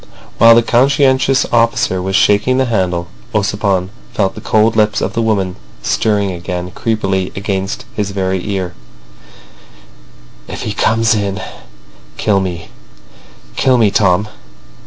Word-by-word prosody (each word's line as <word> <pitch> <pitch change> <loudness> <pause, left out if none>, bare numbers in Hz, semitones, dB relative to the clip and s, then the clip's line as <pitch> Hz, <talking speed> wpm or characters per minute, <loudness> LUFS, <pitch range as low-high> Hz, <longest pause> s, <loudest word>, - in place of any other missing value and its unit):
While 115 0 +8
the 115 - +4
conscientious 130 +2 +3
officer 115 -5 +1
was 95 +1 -2
shaking 105 +7 +3
the 130 - +2
handle, 90 -7 -1 0.3
Ossipon 100 -2 0 0.2
felt 95 -4 +1
the - - -10
cold 110 +1 +2
lips 105 -1 +2
of - - -2
the 115 - 0
woman 100 -5 -1 0.3
stirring 100 -3 0
again 90 0 -5
creepily 95 -5 -1
against 100 0 -3
his 105 -2 -2
very 95 -2 -2
ear: 95 -3 -3 1.7
"If - - -6
he 105 - -3
comes 115 +2 +2
in 100 -2 -2 0.8
kill 100 -2 +2
me—kill 90 - -4
me, 110 -4 +3
Tom." 100 0 +2
100 Hz, 125 wpm, -15 LUFS, 95-115 Hz, 1.7 s, While